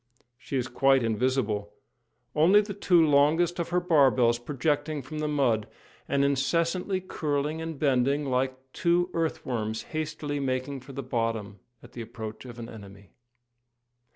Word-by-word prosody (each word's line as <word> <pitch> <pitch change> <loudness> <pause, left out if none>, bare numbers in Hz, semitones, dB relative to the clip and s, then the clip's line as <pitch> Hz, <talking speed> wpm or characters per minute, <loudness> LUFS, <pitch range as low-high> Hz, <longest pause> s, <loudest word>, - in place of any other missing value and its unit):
She 135 - -4
is 125 -1 -1
quite 135 -1 +3
invisible, 110 -3 0 0.6
only 170 +7 +6
the 205 -1 -6
two 180 -4 +4
longest 155 +4 +3
of 170 - -2
her 180 +1 +2
barbels 130 -9 +4
projecting 145 +3 -1
from 150 +4 -6
the 155 - -1
mud, 130 -8 +1 0.4
and 140 0 +2
incessantly 170 +7 0
curling 150 -3 -2
and 160 -2 -5
bending 140 +1 +2
like 130 0 0 0.2
two 175 +1 +1
earth 165 -1 -2
worms 110 -3 -2
hastily 155 -2 -3
making 135 +1 -2
for 135 +2 -12
the 140 +1 -5
bottom 115 -5 -2 0.2
at 120 - -14
the 120 - -7
approach 110 0 -8
of 120 -1 -9
an 115 -1 -7
enemy. 100 -3 -12
140 Hz, 150 wpm, -27 LUFS, 120-155 Hz, 0.6 s, only